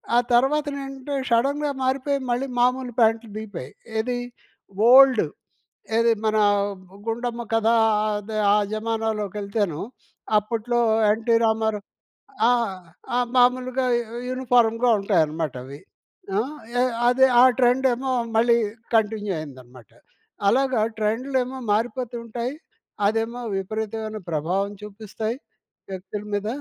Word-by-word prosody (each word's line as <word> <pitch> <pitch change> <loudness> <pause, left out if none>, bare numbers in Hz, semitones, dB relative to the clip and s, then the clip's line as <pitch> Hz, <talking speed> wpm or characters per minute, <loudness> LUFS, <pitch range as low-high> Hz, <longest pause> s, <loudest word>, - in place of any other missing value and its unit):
ఆ - - +6 0.2
తర్వాతనేంటో 275 +1 0 0.2
షడన్‌గా 280 +5 +1
మారిపోయి 275 +2 0
మళ్ళీ 250 +3 0
మామూలు 250 0 +1
ప్యాంట్లు 225 0 +2
దిగిపోయాయి. 200 -11 -7 0.3
ఏదీ, 245 +2 -1 0.7
ఓల్డ్. 260 -4 +7 0.7
ఏది 230 0 +4
మనా 215 -1 +3 0.6
'గుండమ్మ 235 +1 -3
కథ' 225 0 +3 0.4
ఆద్ 210 +1 -3 0.2
ఆ - - +5 0.2
జమానాలోకెళ్తేను 210 -5 -2 0.6
అప్పట్లో 230 +3 -2 0.3
'ఎన్టీ 230 +1 +1
రామారావు' 220 -2 0 0.6
ఆ! - - +5 0.6
ఆ! - - +2 0.2
మాములుగా 255 +1 +2
యు 235 0 -5
యూనిఫారమ్‌గా 245 -2 +2
ఉంటాయనమాటవి. 155 - -1 0.6
ఆ! - - +3 0.4
య - - +1 0.3
అదే 265 +1 +5 0.2
ఆ - - +8 0.2
ట్రెండేమో 255 +1 +2 0.2
మళ్ళీ 235 +1 +4 0.4
కంటిన్యూ 210 -2 +1
అయిందనమాట. 130 -5 -12 0.6
అలాగా 260 0 +2 0.2
ట్రెండ్లేమో 255 +4 -1
మారిపోతూంటాయి, 235 +2 -2 0.5
అదేమో 225 +3 -1 0.2
విపరీతమైన 220 +2 -4
ప్రభావం 185 +7 -1
చూపిస్తాయి 215 +2 -5 0.6
వ్యక్తుల 190 +2 -6
మీద. 205 +1 -1
225 Hz, 95 wpm, -23 LUFS, 210-250 Hz, 0.7 s, ఆ